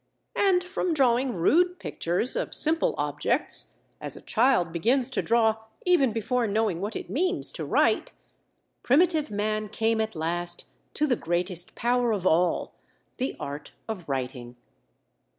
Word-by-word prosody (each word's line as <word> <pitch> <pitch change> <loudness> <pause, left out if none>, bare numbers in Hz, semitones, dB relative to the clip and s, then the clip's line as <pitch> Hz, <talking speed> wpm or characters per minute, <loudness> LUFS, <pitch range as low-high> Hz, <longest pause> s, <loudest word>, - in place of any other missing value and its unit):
And 370 -3 +3
from 360 -2 -2
drawing 255 -2 +2
rude 355 - +3
pictures 180 - -1
of - - -2
simple 320 +1 +2
objects, - - 0 0.2
as - - -5
a - - -11
child 225 -8 +2
begins 240 +9 +1
to - - 0
draw 225 -1 +3 0.3
even 345 -9 +4
before 230 +2 0
knowing 205 -4 0
what 210 +2 -3
it - - -5
means 365 +6 0
to - - -6
write, - - +2 0.7
primitive 310 +2 +3
man 215 +1 -2
came 220 +1 +1
at 220 -2 -3
last 175 +2 -2 0.3
to 300 - +2
the 265 -4 +2
greatest 175 -1 -2
power 245 0 +1
of 195 -3 -3
all—the 180 +8 -1
art 145 +1 -6
of 190 -8 -6
writing. 125 -2 -4
225 Hz, 140 wpm, -26 LUFS, 175-270 Hz, 0.7 s, even